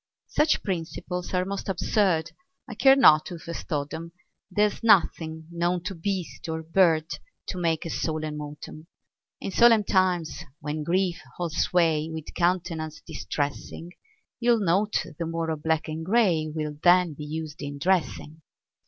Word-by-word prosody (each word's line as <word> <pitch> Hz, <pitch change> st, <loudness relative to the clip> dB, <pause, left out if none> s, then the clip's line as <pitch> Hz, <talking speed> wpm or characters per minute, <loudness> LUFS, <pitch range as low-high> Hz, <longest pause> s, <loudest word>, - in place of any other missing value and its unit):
Such 300 Hz, 0 st, +2 dB
principles 180 Hz, -1 st, -4 dB
are 180 Hz, 0 st, +1 dB
most 200 Hz, +1 st, -4 dB
absurd, 175 Hz, -3 st, +1 dB, 0.4 s
I 245 Hz, -, -7 dB
care 270 Hz, +5 st, +6 dB
not 155 Hz, -, +6 dB
who 175 Hz, -, -6 dB
first 170 Hz, +1 st, -8 dB
taught 145 Hz, -3 st, -2 dB
'em; 165 Hz, +1 st, -7 dB, 0.4 s
There's 205 Hz, +2 st, +1 dB
nothing 160 Hz, -7 st, +3 dB
known 175 Hz, +1 st, 0 dB
to 190 Hz, -, -4 dB
beast 185 Hz, -1 st, -4 dB
or 160 Hz, 0 st, -3 dB
bird 165 Hz, -1 st, +3 dB, 0.4 s
To 185 Hz, -, -3 dB
make 165 Hz, 0 st, 0 dB
a 165 Hz, -, -4 dB
solemn 155 Hz, -1 st, -3 dB
autumn. 150 Hz, +2 st, -9 dB, 0.5 s
In -, -, -4 dB
solemn 230 Hz, 0 st, +6 dB
times, 180 Hz, -5 st, +1 dB, 0.2 s
when 150 Hz, +1 st, -4 dB
grief 180 Hz, +1 st, 0 dB, 0.2 s
holds 170 Hz, -3 st, -3 dB
sway 160 Hz, -3 st, +2 dB
With 160 Hz, -1 st, -7 dB
countenance 165 Hz, -3 st, -1 dB
distressing, 145 Hz, +3 st, -4 dB, 0.5 s
You'll 235 Hz, -1 st, +3 dB
note 190 Hz, +1 st, +1 dB
the 165 Hz, -, -2 dB
more 165 Hz, 0 st, -2 dB
of 155 Hz, -2 st, -4 dB
black 160 Hz, 0 st, 0 dB
and 160 Hz, +1 st, -4 dB
gray 185 Hz, -5 st, +2 dB
Will 150 Hz, -1 st, -4 dB
then 180 Hz, -2 st, +5 dB
be 150 Hz, -, -8 dB
used 155 Hz, 0 st, -6 dB
in 145 Hz, -1 st, -5 dB
dressing. 160 Hz, -2 st, -1 dB
165 Hz, 155 wpm, -26 LUFS, 155-185 Hz, 0.5 s, care